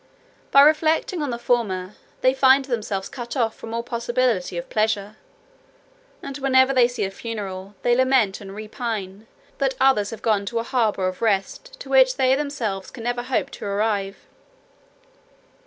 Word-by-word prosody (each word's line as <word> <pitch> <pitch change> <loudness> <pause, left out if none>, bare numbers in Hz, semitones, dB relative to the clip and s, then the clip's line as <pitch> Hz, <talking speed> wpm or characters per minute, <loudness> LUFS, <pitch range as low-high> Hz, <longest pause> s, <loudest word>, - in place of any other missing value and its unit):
By 275 - +7
reflecting 315 +3 +3
on 290 - -2
the 235 - -3
former, 210 -6 -1 0.3
they 255 0 +4
find 265 0 +4
themselves 215 -6 -3
cut 240 +1 -7
off 225 -3 0
from 225 - -9
all 230 0 -2
possibility 235 -6 -1
of 170 - -5
pleasure; 215 -1 -1 1.1
and 275 0 -6
whenever 265 0 +4
they 250 -2 +5
see 245 - -4
a 195 - -2
funeral, 200 -3 -6
they 240 - +3
lament 255 -7 +2
and 195 -1 -9
repine 215 -2 -5 0.3
that 270 -1 0
others 260 -6 +3
have 225 - -9
gone 205 -3 +1
to 235 - -3
a 230 - 0
harbour 220 -6 0
of 185 0 -5
rest 230 - -1
to - - -9
which - - +5
they 260 0 +3
themselves 250 -9 -3
never 240 +1 -2
can - - -12
hope - - 0
to - - -8
arrive. 200 -1 -1
235 Hz, 165 wpm, -23 LUFS, 205-260 Hz, 1.1 s, By